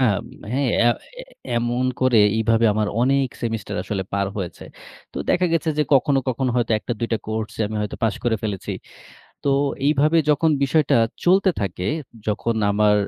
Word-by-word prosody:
আব 110 Hz, -4 st, +2 dB, 0.3 s
হ্যাঁ, 135 Hz, +1 st, +1 dB
এ, -, -, +4 dB, 0.3 s
এ -, -, -8 dB, 0.3 s
এমন 120 Hz, +2 st, 0 dB, 0.2 s
করে 130 Hz, -3 st, +4 dB, 0.2 s
এভাবে 115 Hz, +1 st, +3 dB
আমার 105 Hz, -1 st, 0 dB
অনেক 135 Hz, +1 st, +2 dB
সেমিস্টার 115 Hz, -1 st, -3 dB
আসলে 95 Hz, 0 st, -3 dB
পার 100 Hz, 0 st, 0 dB
হয়েছে। 95 Hz, -4 st, -5 dB, 0.5 s
তো -, -, -12 dB
দেখা 180 Hz, 0 st, +3 dB
গেছে 165 Hz, -1 st, +1 dB
যে, -, -, +5 dB
কখনো, 135 Hz, +1 st, +3 dB
কখনো 130 Hz, 0 st, 0 dB
হয়তো 120 Hz, -2 st, 0 dB
১ -, -, -20 dB
টা-২ 115 Hz, 0 st, -2 dB
টা 115 Hz, -, +2 dB
কোর্সে 110 Hz, 0 st, -4 dB
আমি 110 Hz, -, -4 dB
হয়তো 105 Hz, -, -3 dB
পাশ 110 Hz, -2 st, +2 dB
করে 115 Hz, -2 st, +2 dB
ফেলেছি। 105 Hz, -4 st, -4 dB, 0.7 s
তো -, -, -1 dB, 0.4 s
এইভাবে 150 Hz, +3 st, +3 dB
যখন 160 Hz, +2 st, +3 dB
বিষয়টা 150 Hz, +1 st, +2 dB, 0.3 s
চলতে 190 Hz, +2 st, +4 dB
থাকে, 90 Hz, -2 st, -3 dB, 0.4 s
যখন 110 Hz, +2 st, -1 dB, 0.2 s
আমার 105 Hz, 0 st, +3 dB
115 Hz, 170 wpm, -22 LUFS, 105-135 Hz, 0.7 s, যে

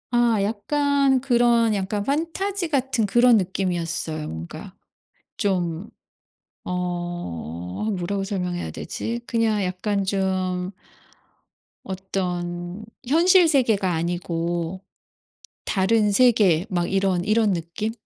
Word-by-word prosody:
아 240 Hz, -3 st, +3 dB
약간 275 Hz, +5 st, +1 dB
그런 240 Hz, -3 st, +3 dB
약간 200 Hz, +1 st, -2 dB
판타지 335 Hz, -, -1 dB
같은 265 Hz, -6 st, +1 dB
그런 240 Hz, +3 st, +5 dB
느낌이었어요. 175 Hz, -5 st, -2 dB
뭔가. 80 Hz, +1 st, -8 dB, 0.6 s
좀. 180 Hz, -1 st, -1 dB, 0.8 s
어. 175 Hz, -, -4 dB
뭐라고 195 Hz, +3 st, -2 dB
설명해야 180 Hz, -3 st, -3 dB
되지? 235 Hz, +1 st, -4 dB
그냥 225 Hz, -4 st, +1 dB
약간 195 Hz, +2 st, -1 dB
좀 185 Hz, -1 st, -1 dB, 1.1 s
어떤 180 Hz, -1 st, -4 dB, 0.2 s
현실 345 Hz, +5 st, +5 dB
세계가 225 Hz, -, +2 dB
아니고 170 Hz, +1 st, -2 dB, 0.8 s
다른 210 Hz, +2 st, +2 dB
세계 200 Hz, -7 st, +4 dB
막 175 Hz, -3 st, -1 dB
이런 190 Hz, -2 st, +1 dB
이런 215 Hz, 0 st, +2 dB
느낌? 170 Hz, +6 st, -3 dB
195 Hz, 195 characters per minute, -23 LUFS, 175-230 Hz, 1.1 s, 그런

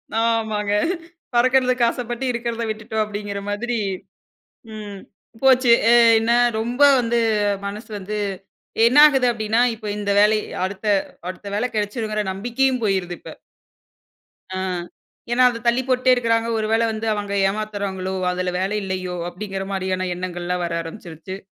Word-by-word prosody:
ஆமாங்க 220 Hz, -3 st, 0 dB, 0.6 s
"பறக்கறதுக்கு 255 Hz, 0 st, +3 dB
ஆசப்பட்டு 240 Hz, +1 st, -4 dB
இருக்கறத 235 Hz, -1 st, -3 dB
விட்டுட்டோம்" 215 Hz, 0 st, -2 dB
அப்டின்கிற 205 Hz, -1 st, -5 dB
மாதிரி 235 Hz, +3 st, -2 dB, 0.9 s
ம் 205 Hz, -2 st, -8 dB, 0.4 s
போச்சு. 255 Hz, -2 st, +5 dB, 0.5 s
என்ன 225 Hz, +1 st, 0 dB, 0.3 s
ரொம்ப 240 Hz, +5 st, -3 dB, 0.2 s
வந்து 235 Hz, 0 st, +1 dB, 0.5 s
மனசு 210 Hz, +3 st, -6 dB
வந்து 210 Hz, +2 st, -5 dB, 0.7 s
என்ன 245 Hz, +4 st, +4 dB
ஆகுது? 265 Hz, -4 st, +4 dB
அப்டின்னா 225 Hz, +1 st, 0 dB
இப்ப 215 Hz, -1 st, -9 dB
இந்த 205 Hz, -1 st, -1 dB
வேலை 210 Hz, +1 st, +5 dB, 0.3 s
அடுத்த 195 Hz, +2 st, -7 dB, 0.4 s
அடுத்த 185 Hz, +2 st, -9 dB
வேலை 245 Hz, +4 st, 0 dB
கெடைச்சிரும்ன்கிற 215 Hz, 0 st, -2 dB
நம்பிக்கையும் 245 Hz, +5 st, 0 dB
போய்ருது 190 Hz, -4 st, 0 dB
இப்ப. -, -, -10 dB, 1.2 s
ஆ. -, -, -2 dB, 0.7 s
ஏன்னா, 255 Hz, +1 st, +4 dB
அத 230 Hz, -2 st, -6 dB
தள்ளி 240 Hz, +2 st, +3 dB
போட்டே 255 Hz, 0 st, +3 dB
இருக்கிறாங்க. 230 Hz, -2 st, +1 dB
"ஒரு 215 Hz, -1 st, -1 dB
வேளை 230 Hz, +1 st, +3 dB
வந்து 220 Hz, 0 st, -4 dB
அவங்க 205 Hz, -1 st, -4 dB, 0.2 s
ஏமாத்துறாங்களோ? 200 Hz, -2 st, -3 dB, 0.2 s
அதுல 180 Hz, 0 st, -2 dB
வேலை 195 Hz, +3 st, -1 dB
இல்லையோ?" 185 Hz, -1 st, -3 dB
அப்படிங்கிற 195 Hz, +1 st, -5 dB
மாரியான 185 Hz, -1 st, -2 dB
எண்ணங்கள்லாம் 180 Hz, 0 st, -3 dB
வர 170 Hz, -, -3 dB
ஆரம்பிச்சுருச்சு. 165 Hz, +1 st, -8 dB
215 Hz, 130 wpm, -21 LUFS, 195-235 Hz, 1.2 s, போச்சு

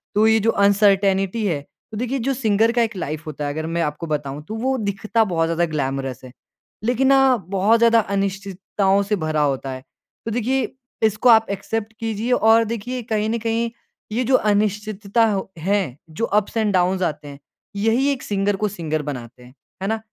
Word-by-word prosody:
तो 215 Hz, +2 st, +5 dB
ये 220 Hz, 0 st, +4 dB
जो 225 Hz, +2 st, +2 dB
अनसर्टेंटी 200 Hz, 0 st, +3 dB
है, 160 Hz, -7 st, 0 dB, 0.3 s
तो 215 Hz, -, -6 dB
देखिए 250 Hz, +4 st, -2 dB
जो 270 Hz, +3 st, 0 dB
सिंगर 225 Hz, -3 st, +2 dB
का 240 Hz, 0 st, +1 dB
एक 225 Hz, -2 st, -1 dB
लाइफ 155 Hz, -3 st, -4 dB
होता 150 Hz, -1 st, -4 dB
है 145 Hz, -, -2 dB
अगर 155 Hz, +1 st, -4 dB
मैं 170 Hz, +1 st, -1 dB
आपको 150 Hz, +1 st, -3 dB
बताऊँ 145 Hz, -2 st, -3 dB
तो 220 Hz, -, -5 dB
वो 260 Hz, +4 st, 0 dB
दिखता 215 Hz, +1 st, 0 dB
बहुत 165 Hz, -5 st, 0 dB
ज़्यादा 165 Hz, +1 st, +1 dB
ग्लैमरस 135 Hz, -3 st, -3 dB
है 130 Hz, -, -11 dB, 0.5 s
लेकिन 250 Hz, +3 st, +2 dB
ना 270 Hz, -1 st, +5 dB
बहुत 195 Hz, +4 st, +2 dB
ज़्यादा 230 Hz, 0 st, +5 dB
अनिश्चितताओं 195 Hz, 0 st, -1 dB
से 205 Hz, +1 st, 0 dB
भरा 155 Hz, -4 st, -1 dB
होता 135 Hz, -2 st, 0 dB
है। 130 Hz, 0 st, -6 dB, 0.4 s
तो 225 Hz, -, -3 dB
देखिए 245 Hz, +4 st, 0 dB, 0.4 s
इसको 220 Hz, +3 st, +3 dB
आप 225 Hz, -2 st, +6 dB
एक्सेप्ट 210 Hz, +2 st, -3 dB
कीजिए 225 Hz, +1 st, -2 dB
और 225 Hz, -1 st, +5 dB
देखिए 235 Hz, +3 st, -4 dB
कहीं 215 Hz, 0 st, +1 dB
न 230 Hz, -, 0 dB
कहीं 230 Hz, +1 st, -1 dB, 0.4 s
ये 245 Hz, +4 st, 0 dB
जो 260 Hz, +2 st, +3 dB
अनिश्चितता 210 Hz, 0 st, +1 dB
हो 195 Hz, -1 st, -3 dB
है, 185 Hz, -5 st, -1 dB
जो 160 Hz, +9 st, -2 dB
अप्स 210 Hz, +1 st, 0 dB
एंड 215 Hz, -3 st, +1 dB
डाउन्स 185 Hz, +1 st, +2 dB
आते 150 Hz, -3 st, -3 dB
हैं 140 Hz, -1 st, -10 dB, 0.4 s
यही 225 Hz, +6 st, +2 dB
एक 265 Hz, -, -4 dB
सिंगर 200 Hz, 0 st, 0 dB
को 210 Hz, +2 st, -1 dB
सिंगर 160 Hz, -6 st, -3 dB
बनाते 125 Hz, -4 st, -7 dB
हैं। 125 Hz, +1 st, -16 dB, 0.3 s
है 195 Hz, -, -2 dB
ना। 220 Hz, 0 st, -1 dB
205 Hz, 195 wpm, -21 LUFS, 170-225 Hz, 0.5 s, आप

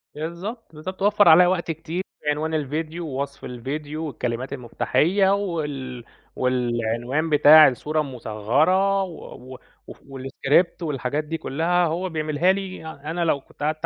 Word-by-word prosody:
بالضبط، 170 Hz, +7 st, -6 dB
بالضبط، 185 Hz, +5 st, -7 dB
وفّر 205 Hz, -2 st, +5 dB
عليّا 175 Hz, +3 st, +8 dB
وقت 175 Hz, -2 st, 0 dB
كتير 165 Hz, +3 st, -4 dB, 0.3 s
عنوان 155 Hz, +2 st, -2 dB
الفيديو 155 Hz, +3 st, -3 dB
ووصف 140 Hz, 0 st, -5 dB
الفيديو 145 Hz, +6 st, -5 dB
والكلمات 130 Hz, -2 st, -4 dB
المُفتاحيّة 145 Hz, -, +1 dB
وال 145 Hz, -10 st, -3 dB, 0.3 s
والعنوان 125 Hz, +3 st, -1 dB
بتاع 155 Hz, +1 st, +8 dB
الصورة 150 Hz, +4 st, -1 dB
المُصغّرة 145 Hz, -, +1 dB
و 130 Hz, -7 st, -10 dB
و 130 Hz, -, -9 dB, 0.3 s
وف -, -, -11 dB
والاسكريبت 135 Hz, +6 st, 0 dB
والحاجات 145 Hz, 0 st, -2 dB
دي 165 Hz, +2 st, -4 dB
كلّها 170 Hz, +6 st, 0 dB
هو 175 Hz, +3 st, -2 dB
بيعملها 155 Hz, +2 st, +1 dB
لي 190 Hz, -4 st, -5 dB
أ 155 Hz, -1 st, -7 dB
أنا 170 Hz, 0 st, -1 dB
لو 145 Hz, -4 st, +1 dB
كنت 145 Hz, -, -12 dB
قعدت 155 Hz, +1 st, -1 dB
155 Hz, 140 wpm, -23 LUFS, 135-170 Hz, 0.3 s, عليّا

